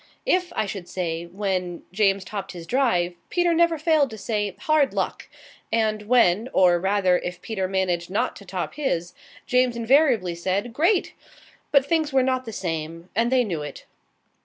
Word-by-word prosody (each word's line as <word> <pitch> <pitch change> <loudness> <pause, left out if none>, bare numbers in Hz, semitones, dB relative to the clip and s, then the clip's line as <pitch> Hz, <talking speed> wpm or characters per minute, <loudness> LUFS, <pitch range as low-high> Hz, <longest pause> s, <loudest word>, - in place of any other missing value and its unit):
If 365 -7 +1
I - - 0
should 195 -3 -6
say 170 -2 -3
when, 185 -2 -3
James 195 -1 +2
topped 195 -1 -6
his 170 -2 -8
drive, 205 -8 +1 0.2
Peter 350 -1 +2
never 335 0 +3
failed 310 -3 +2
to 220 - -9
say 205 -2 -2
"Hard 310 -3 +2
luck!" - - -3 0.4
And 215 -2 0
when 230 -2 +3
or, 175 -2 +5
rather, 190 -1 +2
if 180 0 -6
Peter 195 -4 -2
managed 180 -2 -1
not 200 - -1
to - - -12
top 180 -1 -4
his, 180 - -2 0.3
James 250 -2 +2
invariably 235 - +3
said 190 +7 -2
"Great!" 345 - +2 0.6
But 280 -2 +5
things 315 -1 +1
were 265 -1 +3
not 255 0 0
the 225 - -6
same, 165 -2 -5
and 230 +3 +2
they 255 -1 +4
knew 175 -9 -3
it. 150 - -8
205 Hz, 170 wpm, -24 LUFS, 180-260 Hz, 0.6 s, or